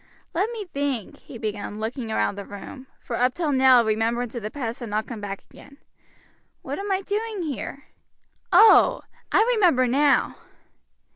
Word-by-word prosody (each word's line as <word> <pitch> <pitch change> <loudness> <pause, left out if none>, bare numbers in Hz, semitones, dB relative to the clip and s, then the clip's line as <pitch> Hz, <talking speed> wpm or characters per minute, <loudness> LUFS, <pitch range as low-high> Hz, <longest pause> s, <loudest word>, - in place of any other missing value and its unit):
"Let 385 +6 0
me 445 -3 -5
think," 280 - -3
he 250 - -11
began, 210 -1 -5
looking 230 +2 -4
round 220 - 0
the 200 - -6
room, 230 +7 -10
for 235 - -5
up 250 +1 +1
till 325 -4 -1
now 260 -2 +6
remembrance 225 +2 0
of 240 - -5
the 215 - -4
past 235 -3 -5
had 240 -3 -6
not 215 +1 -1
come 230 -4 -8
back 195 -1 -6
again, 280 - -16 0.9
"what - - -5
am 400 0 -3
I 380 0 +1
doing 420 -1 -3
here? 280 -2 -5 0.7
Oh! 435 +6 +6 0.3
I - - +5
remember 345 - +4
now." 280 +4 +2
255 Hz, 165 wpm, -24 LUFS, 225-345 Hz, 0.9 s, now